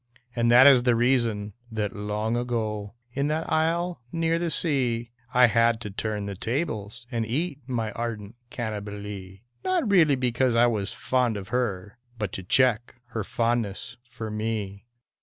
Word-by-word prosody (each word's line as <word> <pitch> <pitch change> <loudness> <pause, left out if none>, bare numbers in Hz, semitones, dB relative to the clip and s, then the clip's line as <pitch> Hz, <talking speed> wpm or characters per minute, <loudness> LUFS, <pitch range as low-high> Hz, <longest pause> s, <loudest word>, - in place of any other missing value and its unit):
And 115 -1 +2
that 125 +3 +8
is 135 -3 +8
the 120 -1 +3
reason 115 -4 +1 0.2
that 105 -2 -2
long 105 +2 -2
ago. 110 -4 -2 0.2
In 140 +2 0
that 155 +2 -2
island 170 +2 +1
near 165 0 +1
the 170 0 -1
sea, 125 -8 0 0.2
I 125 0 +6
had 115 0 +3
to 105 -4 -5
turn 105 0 -3
the 100 - -4
tables 115 - -3
and 115 -2 0
eat 145 +6 -2
My 115 -4 -2
ardent 115 -3 -5 0.2
Cannibalee 105 -3 -6
— - - -43
Not 370 -8 +1
really 160 -7 +5
because 125 -1 +1
I 120 +1 +6
was 105 -4 0
fond 125 -4 0
of 95 -2 -8
her, 105 -4 -2 0.2
But 105 -4 -3
to 95 - -5
check 120 +4 +2
her 110 -2 -3
fondness 115 -2 -1
for 115 -2 -6
me. 105 -1 -3
115 Hz, 160 wpm, -26 LUFS, 105-125 Hz, 0.2 s, that